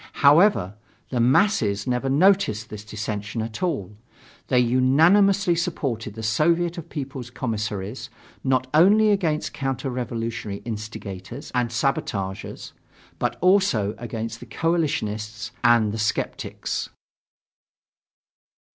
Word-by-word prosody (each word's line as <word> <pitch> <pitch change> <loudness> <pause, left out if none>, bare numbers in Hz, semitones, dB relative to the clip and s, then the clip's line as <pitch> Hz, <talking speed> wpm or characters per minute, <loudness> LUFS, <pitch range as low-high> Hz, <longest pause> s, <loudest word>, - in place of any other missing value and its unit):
However, 145 - +4 0.4
the 125 - -1
masses 120 - +3
never 125 +1 -1
noticed 140 - +3
this 105 -1 -7
dissension 105 0 -4
at 110 0 -7
all. 135 - -2 0.5
They 130 - +2
unanimously 165 - +4
supported 135 - -3
the 110 - -7
Soviet 170 - +1
of 170 0 -10
People's 135 -4 -6
Commissaries, 110 -3 -4 0.3
not 130 -1 +2
only 210 +7 +6
against 165 -7 0
counter 135 -1 -3
revolutionary 115 -4 -4
instigators 110 - -7
and 125 -2 +1
sabotagers 110 -5 -2 0.5
but - - -1
also 180 - +3
against 115 -1 -5
the 120 - -11
coalitionists 115 -9 -2
and 120 -3 +4
the 110 - -4
skeptics. 105 - -2
125 Hz, 105 wpm, -24 LUFS, 110-160 Hz, 0.5 s, only